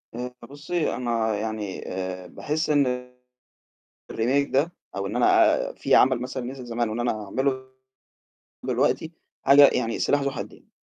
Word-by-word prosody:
آآ 125 +1 -5 0.2
بُصّي، 150 +3 -2
أنا 115 -3 0
يعني 105 -2 -4
آآ 95 -1 -5
باحس 155 - -3
إن 125 -4 +1 1.0
الRemake 135 +5 +1
ده، 150 +6 +1 0.2
أو 100 0 -2
إن 105 +4 -4
أنا 125 - +5 0.2
أ - - -10
في - - +1
عمل 130 -2 +5
مثلًا 130 0 -4
نزل 130 0 -7
زمان، 120 -1 -2
وإن 110 +2 -3
أنا 110 -3 -1
أعمله 130 +5 -1 1.0
دلوقتي 160 - 0 0.3
حاجة 140 +1 +8
يعني 115 -2 -1
سلاح 145 - +2
ذو 140 0 -1
حدين، - - -9
125 Hz, 150 wpm, -25 LUFS, 110-140 Hz, 1.0 s, حاجة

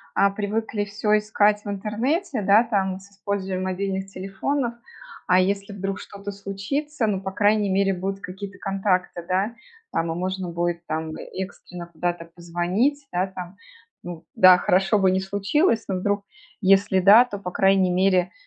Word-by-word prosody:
а, 200 - +4
привыкли 210 +1 -2
всё 210 +1 +1
искать 210 0 +2
в - - -4
интернете, 230 - -1
да, 200 +3 +5
там, 195 -5 -1
с 195 +1 -17
использованием 195 -2 -3
мобильных 190 +1 -2
телефонов, 230 +7 -3 0.5
а 180 0 +5
если 200 +2 0
вдруг 195 -1 -4
что-то 200 0 -8
случится, 210 +8 -3
ну, 195 -3 -1
по 190 0 -4
крайней 205 +1 +2
мере, 195 +1 +2
будут 195 +2 -4
какие-то 195 +1 -8
контакты, 185 -3 -1
да. 195 +5 0 0.4
Там 165 0 -1
и - - -3
можно 185 +1 -3
будет 170 0 -2
там 160 0 -3 0.2
экстренно 180 -2 -7
куда-то 175 0 -3
позвонить. 175 - -1
Да, 180 +2 0
там, 185 0 -9 0.5
ну 170 -2 -8
да, 185 -1 +8
хорошо 190 +4 +2
бы 190 -1 +4
не 190 - +1
случилось, 210 - +1
но 190 - -1
вдруг, 200 +2 -1 0.4
если 195 0 +4
да, 205 +6 +8
то, 205 -5 -7
по 180 -2 -6
крайней 195 0 +3
мере, 185 -1 +2
195 Hz, 160 wpm, -24 LUFS, 185-205 Hz, 0.5 s, да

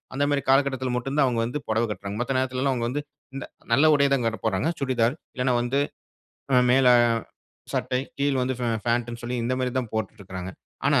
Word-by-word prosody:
அந்த 145 +1 +2
மாதிரி 140 -1 +1
காலகட்டத்தில 130 -2 +2
மட்டும் 135 +4 -3
தான் 145 - +6
அவுங்க 120 -2 0
வந்து, 135 +5 -3
பொடவை 110 +1 +2
கட்றாங்க. 100 +1 -6
மத்த 130 +2 0
நேரத்திலலாம் 130 +1 0
அவங்க 120 -1 -1
வந்து, 145 +4 -2 0.3
இந்த 135 - -4 0.3
நல்ல 155 +2 +6
உடைய 140 -1 +3
தான்ங்க 115 -3 -1
போடறாங்க. 100 +5 +1
சுடிதார், 125 -1 +1 0.2
இல்லன்னா 125 -1 +1
வந்து 135 +4 +1 0.9
மேல 130 0 +4 0.9
சட்டை, 125 0 0 0.2
கீழ் 140 -2 +1
வந்து 130 +1 0
ஃபே 120 - 0 0.2
ஃபேண்ட் 120 0 +1
ன்னு 120 0 -8
சொல்லி, 125 +1 -2
இந்த 125 - 0
மாரி 130 -1 0
தான் 120 -4 -7
போட்டுட்ருக்காங்க. 95 -4 -4 0.4
ஆனா, - - +4
125 Hz, 185 wpm, -25 LUFS, 115-135 Hz, 0.9 s, தான்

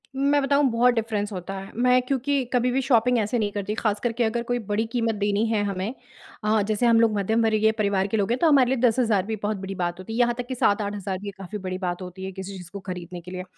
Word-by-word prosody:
मैं 285 +2 +2
बताऊँ 280 +1 +2
बहुत 245 +2 +4
डिफरेंस 220 -2 -2
होता 185 +1 -5
है, 195 0 -8
मैं 250 +2 +4
क्योंकि 275 +1 0
कभी 250 0 +2
भी 265 +2 +1
शॉपिंग 250 -2 +3
ऐसे 215 +3 0
नहीं 205 -2 0
करती 205 +1 -3
ख़ास 215 -2 0
करके 240 0 0
अगर 235 +1 0
कोई 245 +1 -1
बड़ी 215 0 -1
कीमत 230 -2 0
देनी 205 +1 +1
है 220 -2 +1
हमें 200 +2 -2 0.5
अ, 215 0 +3
जैसे 215 +3 0
हम 230 -1 +5
लोग 225 -1 +4
मध्यम 220 +3 +1
वर्गीय 220 0 +3
परिवार 200 -3 0
के 220 - -1
लोग 205 +1 0
हैं, 240 - +2
तो 335 - +4
हमारे 275 -5 +5
लिए 265 - +1
10,000 225 -4 +1
भी 220 +1 -2
बहुत 210 0 -1
बड़ी 195 0 -6
बात 175 -1 -2
होती 185 +4 -7
है, 230 - -2
यहाँ 240 -1 +3
तक 245 -1 -4
कि 260 - -4
7-8,000 205 -3 0
भी 200 +1 -6
काफ़ी 195 +2 -6
बड़ी 185 -2 -4
बात 180 -1 -3
होती 185 +1 -7
है, 190 - -5
किसी 190 +1 -7
चीज़ 180 -2 -10
को 200 - -6
खरीदने 180 -2 -7
के 180 +2 -11
लिए। 185 0 -5
215 Hz, 260 wpm, -24 LUFS, 195-240 Hz, 0.5 s, हम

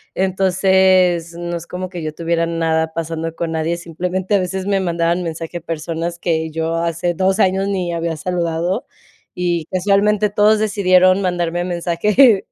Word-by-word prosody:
Entonces, 185 -2 +2
no 175 0 -4
es 170 - -10
como 180 0 -5
que 175 -3 -7
yo 155 - -3
tuviera 170 0 0
nada 160 -1 0
pasando 165 0 -4
con 165 -1 -3
nadie. 160 +2 -1
Simplemente, 180 +3 -3
a - - +3
veces 185 +1 -3
me 200 -1 +1
mandaban 170 0 0
mensaje 165 +1 -5
personas 165 +1 -4
que 160 -2 -1
yo 165 +1 -2
hace 170 +1 -1
2 190 +2 +1
años 190 +1 +2
ni 180 -3 -2
había 165 -1 -2
saludado, 175 - -2 0.5
y 170 -3 0
casualmente 200 +3 +2
todos 210 +1 +4
decidieron 185 -2 +3
mandarme 175 -1 -1
mensaje, 190 +6 +3
175 Hz, 155 wpm, -18 LUFS, 165-190 Hz, 0.5 s, todos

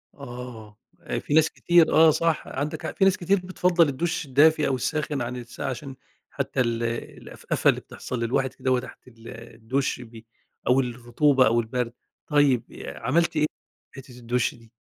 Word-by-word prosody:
آه، 120 -5 -9 0.4
في - - -4
ناس 160 +1 +5
كتير 175 -2 +3
آه، 160 0 +7
صح 160 0 0
عندك 145 +2 -4
حق - - -5
في 195 - +2
ناس 195 -1 +4
كتير 190 +2 +1
بتفضّل 180 -3 +2
الدُش 160 +4 -2
الدافي 150 +3 +4
أو 135 - +1
الساخن 145 +1 -2
عن 120 +1 -3
الساقع 120 +2 -6
عشان 135 +1 -6 0.4
حتى - - -3
ال 120 -1 -1
الأفأفة 115 0 -2
اللي - - +2
بتحصل 125 - -6
للواحد 130 +3 0
كدهوّة 130 -1 0
تحت 125 - -12
ال 125 - -15
الدُش 115 +4 -3
بي 115 -1 -12 0.4
أو 125 +2 +4
الرطوبة 125 +2 +2
أو 115 +2 +3
البرد، 120 +1 -2 0.3
طيب 140 -5 +2
آآ، - - -8
عملت 165 +6 +1
إيه 150 - +3 0.5
في 135 - -9
حتة 125 -2 -14
الدُش 120 +1 -1
دي؟ 115 -2 -19
130 Hz, 170 wpm, -25 LUFS, 120-150 Hz, 0.5 s, آه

